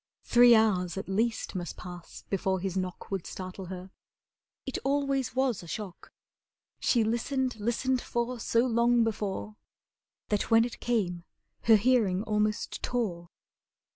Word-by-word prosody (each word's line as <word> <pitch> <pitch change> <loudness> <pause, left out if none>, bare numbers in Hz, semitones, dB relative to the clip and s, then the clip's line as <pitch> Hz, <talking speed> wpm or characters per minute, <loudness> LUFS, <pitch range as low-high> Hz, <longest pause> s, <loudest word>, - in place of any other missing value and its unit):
Three 240 0 +7
hours 190 -5 +2
at 195 - -4
least 225 +4 -1
must 175 -3 -5
pass 175 -1 -10
before 190 -1 0
his 190 0 -3
knock 185 0 -4
Would 195 -3 -3
startle 185 0 -7
her. 185 +1 -8 0.7
It 265 - -3
always 275 -2 0
was 260 -5 +1
a 170 - -11
shock. 195 0 -7 0.7
She 235 -3 +3
listened 245 +2 -1
listened 245 +4 0
for 240 +1 -2
so 230 +2 +2
long 235 0 +3
before, 210 -1 -3 0.7
That 210 -1 0
when 225 0 +6
it 240 - -7
came 185 -8 -1 0.4
her 225 - +8
hearing 210 -4 +3
almost 210 -1 -1
tore. 180 -9 -2
220 Hz, 140 wpm, -29 LUFS, 190-240 Hz, 0.7 s, her